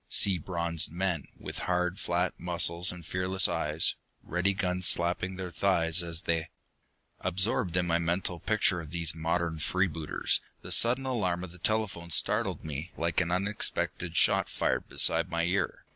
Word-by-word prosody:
Sea 95 Hz, -3 st, +4 dB
bronzed 85 Hz, -2 st, 0 dB
men, 85 Hz, -3 st, -2 dB
with -, -, -7 dB
hard, 90 Hz, +1 st, 0 dB
flat 90 Hz, +1 st, 0 dB
muscles 85 Hz, 0 st, +2 dB
and 90 Hz, -2 st, -10 dB
fearless 90 Hz, +2 st, +1 dB
eyes; 80 Hz, -2 st, +1 dB, 0.3 s
ready 90 Hz, +3 st, 0 dB
guns 90 Hz, -2 st, +1 dB
slapping 90 Hz, +2 st, +1 dB
their 90 Hz, -1 st, -6 dB
thighs 85 Hz, -1 st, +2 dB
as 85 Hz, +1 st, -4 dB
they 80 Hz, -1 st, -1 dB, 0.7 s
Absorbed 90 Hz, -1 st, 0 dB
in 90 Hz, -, +2 dB
my 85 Hz, 0 st, +1 dB
mental 85 Hz, +1 st, -1 dB
picture 100 Hz, -4 st, +1 dB
of 80 Hz, -, -10 dB
these 85 Hz, -1 st, 0 dB
modern 80 Hz, 0 st, -2 dB
free 90 Hz, +6 st, +1 dB
booters, 80 Hz, -3 st, 0 dB, 0.2 s
the -, -, -8 dB
sudden 125 Hz, +3 st, +4 dB
alarm 95 Hz, -9 st, -1 dB
of 95 Hz, -, -8 dB
the 90 Hz, -, -14 dB
telephone 100 Hz, -4 st, -1 dB
startled -, -, +1 dB
me 75 Hz, +3 st, -5 dB
like 85 Hz, +1 st, 0 dB
an 85 Hz, -, -2 dB
unexpected 90 Hz, -2 st, -1 dB
shot -, -, +3 dB
fired -, -, -1 dB
beside 85 Hz, +1 st, +3 dB
my 85 Hz, -1 st, -1 dB
ear. 90 Hz, -1 st, -1 dB
90 Hz, 160 wpm, -29 LUFS, 85-95 Hz, 0.7 s, Sea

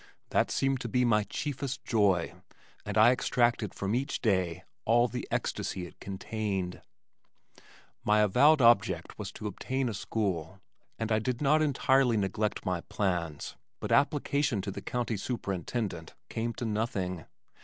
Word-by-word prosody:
that -, -, +2 dB
seemed 135 Hz, -1 st, 0 dB
to 120 Hz, -, -4 dB
be 125 Hz, +2 st, +2 dB
my 105 Hz, -3 st, +3 dB
chiefest 140 Hz, 0 st, -4 dB
joy 100 Hz, -8 st, +2 dB, 0.5 s
and -, -, -2 dB
I 110 Hz, +3 st, +8 dB
extracted 120 Hz, -4 st, +1 dB
from 100 Hz, +1 st, -2 dB
each 130 Hz, +3 st, -1 dB
day 95 Hz, -7 st, 0 dB, 0.2 s
all 120 Hz, +2 st, +4 dB
the -, -, -5 dB
ecstasy 90 Hz, -, -2 dB
it 90 Hz, -, -14 dB
contained. 95 Hz, -2 st, -3 dB, 1.2 s
My 105 Hz, 0 st, +4 dB
avowed 140 Hz, +9 st, +5 dB
object 105 Hz, -7 st, +3 dB
was 100 Hz, -2 st, -5 dB
to 110 Hz, -, -8 dB
obtain 130 Hz, +5 st, -2 dB
a -, -, -3 dB
school 95 Hz, -4 st, -2 dB, 0.4 s
and 110 Hz, 0 st, -3 dB
I 110 Hz, -, +4 dB
did 125 Hz, +2 st, -2 dB
not 150 Hz, +2 st, +3 dB
entirely 135 Hz, -4 st, +3 dB
neglect 105 Hz, +2 st, -1 dB
my 90 Hz, -2 st, -1 dB
plans 85 Hz, -7 st, -2 dB, 0.2 s
but -, -, -4 dB
application 140 Hz, -4 st, +2 dB
to 100 Hz, -, -3 dB
the -, -, -6 dB
county 120 Hz, -3 st, -2 dB
superintendent 100 Hz, -4 st, -3 dB
came 115 Hz, +1 st, -2 dB
to 120 Hz, -, -5 dB
nothing. 100 Hz, -5 st, -2 dB
110 Hz, 145 wpm, -30 LUFS, 95-125 Hz, 1.2 s, I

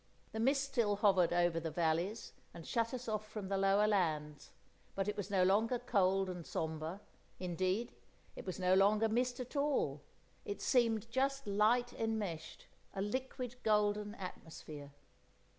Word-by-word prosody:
The 220 Hz, -, -4 dB
mist 270 Hz, +4 st, +3 dB
still 235 Hz, -7 st, +1 dB
hovered 195 Hz, -4 st, +4 dB
over 175 Hz, -1 st, +2 dB
the 165 Hz, 0 st, -3 dB
valleys, 170 Hz, +7 st, -1 dB, 0.2 s
and 165 Hz, -, -9 dB
shut 230 Hz, -1 st, 0 dB
us 250 Hz, -1 st, -5 dB
off 215 Hz, -1 st, -3 dB
from 205 Hz, -4 st, -6 dB
the 195 Hz, -, 0 dB
lower 195 Hz, +2 st, +4 dB
lands, 155 Hz, -8 st, 0 dB, 0.5 s
but 195 Hz, 0 st, -1 dB
it 210 Hz, -, -1 dB
was 205 Hz, -1 st, -4 dB
no 190 Hz, -2 st, +3 dB
longer 220 Hz, +6 st, +3 dB
cold 195 Hz, -5 st, +2 dB
and 180 Hz, -2 st, -5 dB
sombre; 160 Hz, +4 st, -4 dB, 0.4 s
indeed, 185 Hz, +5 st, -1 dB, 0.4 s
it -, -, -7 dB
was 185 Hz, -, -5 dB
no 185 Hz, 0 st, +2 dB
longer 210 Hz, +3 st, +4 dB
mist 245 Hz, +3 st, 0 dB
at 250 Hz, +3 st, -7 dB
all; 280 Hz, -, 0 dB, 0.4 s
it 205 Hz, -, -5 dB
seemed 230 Hz, -3 st, +2 dB
just 275 Hz, +2 st, 0 dB
light 215 Hz, +4 st, +2 dB
enmeshed, 210 Hz, -8 st, -3 dB, 0.3 s
a 195 Hz, -, -2 dB
liquid 250 Hz, +2 st, -4 dB
golden 210 Hz, -1 st, +1 dB
atmosphere. 155 Hz, -6 st, -8 dB
205 Hz, 155 wpm, -35 LUFS, 180-230 Hz, 0.5 s, hovered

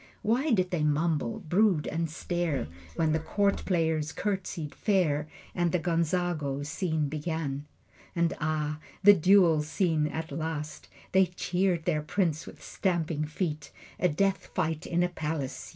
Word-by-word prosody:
Why 250 Hz, +8 st, +2 dB
did 185 Hz, -7 st, +2 dB
they 175 Hz, -3 st, 0 dB
mumble, 160 Hz, +8 st, 0 dB
brood, 185 Hz, -1 st, +2 dB
and 165 Hz, +1 st, -2 dB
stare 165 Hz, -, -2 dB, 0.3 s
When 160 Hz, -2 st, +2 dB
the 160 Hz, -, +2 dB
court 200 Hz, +5 st, 0 dB
players 160 Hz, -4 st, +1 dB
curtsied 180 Hz, -6 st, -3 dB
fair 160 Hz, -8 st, +1 dB, 0.3 s
And 175 Hz, -1 st, +1 dB
the 180 Hz, -, +2 dB
Gonzago 165 Hz, -4 st, 0 dB
scene 160 Hz, -2 st, -1 dB
began? 150 Hz, -1 st, -3 dB, 0.5 s
And 170 Hz, -1 st, +2 dB
ah, 150 Hz, -1 st, -1 dB, 0.2 s
the 205 Hz, +1 st, +10 dB
duel 180 Hz, -3 st, +5 dB
scene 155 Hz, 0 st, +1 dB
at 160 Hz, +1 st, -5 dB
last! 155 Hz, 0 st, -4 dB, 0.2 s
They 190 Hz, 0 st, +5 dB
cheered 180 Hz, -1 st, 0 dB
their 155 Hz, -4 st, +1 dB
prince 160 Hz, 0 st, -1 dB
with -, -, -11 dB
stamping 165 Hz, -5 st, -1 dB
feet. 150 Hz, -2 st, -3 dB, 0.3 s
A 180 Hz, -, +3 dB
death 195 Hz, +5 st, 0 dB
fight 160 Hz, -1 st, -1 dB
in 175 Hz, 0 st, +1 dB
a 180 Hz, -, +1 dB
palace! 155 Hz, -5 st, -4 dB
165 Hz, 145 wpm, -29 LUFS, 150-180 Hz, 0.5 s, the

